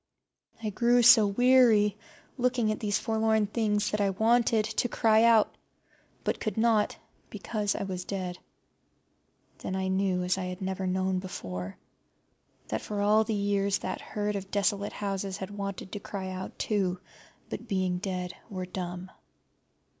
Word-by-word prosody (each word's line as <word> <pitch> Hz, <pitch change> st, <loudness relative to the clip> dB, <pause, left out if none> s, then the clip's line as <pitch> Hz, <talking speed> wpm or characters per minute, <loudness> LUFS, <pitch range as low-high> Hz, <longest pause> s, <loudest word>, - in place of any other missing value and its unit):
I 215 Hz, -, -1 dB
grew 240 Hz, +4 st, +3 dB
so 230 Hz, -3 st, +8 dB
weary 225 Hz, -2 st, +4 dB, 0.4 s
looking 245 Hz, -3 st, +1 dB
at 215 Hz, -, -3 dB
these 210 Hz, -2 st, 0 dB
forlorn 220 Hz, -1 st, +1 dB
things 210 Hz, -1 st, 0 dB
that 210 Hz, -, 0 dB
I 200 Hz, -, +3 dB
wanted 220 Hz, +2 st, +2 dB
to 225 Hz, +2 st, -1 dB
cry 220 Hz, -1 st, +3 dB
out, 230 Hz, -2 st, +5 dB, 0.7 s
but -, -, -1 dB
could 215 Hz, -3 st, -3 dB
not, 220 Hz, -2 st, +2 dB, 0.3 s
because 210 Hz, -3 st, -2 dB
I -, -, -2 dB
was 185 Hz, -2 st, -4 dB
dead. 185 Hz, -2 st, -4 dB, 1.2 s
Then 190 Hz, -, -4 dB
I 190 Hz, 0 st, -1 dB
knew, 190 Hz, -1 st, +1 dB
as 180 Hz, +1 st, 0 dB
I 185 Hz, -, -3 dB
had 180 Hz, 0 st, -5 dB
never 190 Hz, -1 st, -3 dB
known 185 Hz, 0 st, 0 dB
before, 95 Hz, -, -6 dB, 0.9 s
that -, -, -2 dB
for 210 Hz, -1 st, -4 dB
all 210 Hz, +2 st, +4 dB
the 220 Hz, 0 st, -2 dB
years 200 Hz, -1 st, +1 dB
that 185 Hz, -, -5 dB
herd 210 Hz, 0 st, -3 dB
of 195 Hz, -1 st, -5 dB
desolate 200 Hz, 0 st, 0 dB
houses 195 Hz, -1 st, -3 dB
had 190 Hz, 0 st, -6 dB
wanted 200 Hz, -2 st, -5 dB
to 205 Hz, -, -4 dB
cry 190 Hz, -2 st, -5 dB
out 185 Hz, 0 st, -6 dB
too, 190 Hz, -4 st, 0 dB, 0.5 s
but, 240 Hz, -, -6 dB
being 185 Hz, -3 st, 0 dB
dead, 180 Hz, -2 st, -3 dB, 0.2 s
were 185 Hz, -3 st, -4 dB
dumb. 180 Hz, 0 st, -6 dB
200 Hz, 155 wpm, -28 LUFS, 190-220 Hz, 1.2 s, so